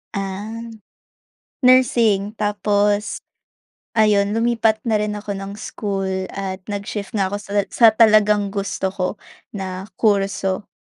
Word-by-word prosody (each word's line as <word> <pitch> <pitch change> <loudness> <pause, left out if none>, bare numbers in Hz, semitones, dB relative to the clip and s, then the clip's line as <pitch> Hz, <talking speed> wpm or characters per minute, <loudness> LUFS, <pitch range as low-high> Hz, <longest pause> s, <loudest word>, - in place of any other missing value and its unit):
Ah. 200 +4 -4 1.0
Nursing 230 -5 +4
tapos, 205 0 0 0.7
ayun, 205 -2 +4
lumipat 225 -1 +1
na 225 - +1
rin 210 0 -2
ako 205 -1 -5
ng 195 0 -6
school, 200 -3 -3 0.2
at 190 -1 -5
nag-shift 205 0 -4
nga 200 -3 +1
ako 200 +2 -3
sa 200 - -10 0.2
sa 235 - +5
talagang 215 -2 +4
gusto 200 -1 -2
ko, 185 -2 -1 0.5
na 190 -2 -5 0.2
kurso. 195 -2 0
205 Hz, 115 wpm, -20 LUFS, 195-215 Hz, 1.0 s, sa